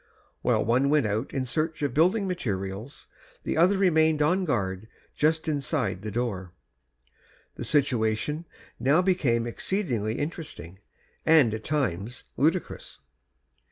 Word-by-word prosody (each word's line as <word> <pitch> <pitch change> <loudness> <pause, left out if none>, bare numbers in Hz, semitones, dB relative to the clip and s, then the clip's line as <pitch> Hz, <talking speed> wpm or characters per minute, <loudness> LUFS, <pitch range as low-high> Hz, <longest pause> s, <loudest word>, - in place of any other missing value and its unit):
While - - +2
one 125 +5 +2
went 150 -4 +3
out 110 +4 -2
in 135 -2 -2
search 155 +4 -2
of 140 -4 0
building 185 - +3
material 105 - -3 0.5
the - - -2
other 180 +5 +4
remained 160 -5 +3
on 180 +5 +2
guard 100 - -2 0.3
just 160 +1 +1
inside 140 - -1
the 110 - -5
door. 100 -6 -3 1.0
The - - -7
situation 135 +2 0 0.3
now 140 +9 +3
became 135 -11 +1
exceedingly 120 - -2
interesting, 145 - -6 0.4
and 150 -9 +5
at 110 0 -5
times 125 - -2
ludicrous. 165 +4 -1
140 Hz, 120 wpm, -27 LUFS, 110-160 Hz, 1.0 s, and